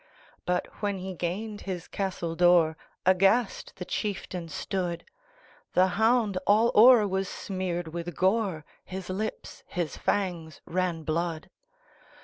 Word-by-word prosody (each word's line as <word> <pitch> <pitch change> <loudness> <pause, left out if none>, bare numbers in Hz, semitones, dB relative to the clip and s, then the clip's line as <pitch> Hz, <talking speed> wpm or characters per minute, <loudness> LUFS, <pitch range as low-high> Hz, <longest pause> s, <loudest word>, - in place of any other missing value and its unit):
But, 180 0 +1 0.2
when 205 -2 0
he 190 +1 -5
gained 205 +5 -4
his 180 -3 -5
castle 185 -4 -3
door, 175 -2 +5 0.3
Aghast 195 +5 +3
the 180 - -6
chieftain 180 -4 -4
stood; 175 +1 -3 0.7
The 185 +1 +4
hound 220 0 +2
all 220 +3 +5
o'er 225 -1 +8
was 190 0 -1
smeared 180 -3 -3
with 170 0 -5
gore, 190 -5 +1 0.2
His 185 0 -6
lips, 215 +4 -5
his 175 -3 -3
fangs, 175 -6 -2
ran 175 -2 -1
blood. 160 +1 -2
185 Hz, 125 wpm, -28 LUFS, 175-200 Hz, 0.7 s, o'er